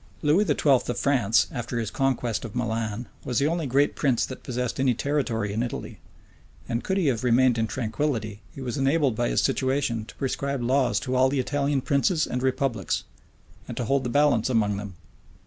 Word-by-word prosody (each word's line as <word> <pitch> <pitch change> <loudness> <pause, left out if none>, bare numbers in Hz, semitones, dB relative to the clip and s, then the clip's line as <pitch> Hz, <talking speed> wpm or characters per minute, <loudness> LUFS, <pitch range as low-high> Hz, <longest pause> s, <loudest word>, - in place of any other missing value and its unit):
Lewis 165 +8 +3
XII. 150 - +1
of 125 -2 +2
France, 120 -6 +3
after 120 -1 -4
his 115 -3 -2
conquest 125 -5 0
of 115 -2 -7
Milan, 115 -1 -2 0.2
was 125 - -2
the 140 - +3
only 165 -1 0
great 140 +3 +2
prince 130 -5 +1
that 130 - -8
possessed 125 0 -3
any 130 -2 +2
territory 115 -7 -1
in 110 - -1
Italy; 120 - -5 0.7
and 115 +1 -2
could 190 - -1
he 190 - +1
have 125 -5 +1
remained 125 -1 +4
in 115 - +1
tranquillity, 110 -2 -2
he 135 - -10
was 125 +1 -3
enabled 135 -2 +2
by 120 +1 0
his - - +2
situation 130 -4 0
to - - -13
prescribe 140 -1 -2
laws 125 -4 +2
to 125 +6 -4
all 130 +1 +4
the 140 0 0
Italian 140 +1 0
princes 150 +5 +2
and 125 - -3
republics, 130 - -1 0.6
and - - -7
to 120 - -1
hold 135 +3 +1
the 125 - -2
balance 140 -3 +3
among 105 -4 +1
them. 100 -2 -7
125 Hz, 195 wpm, -25 LUFS, 115-140 Hz, 0.7 s, remained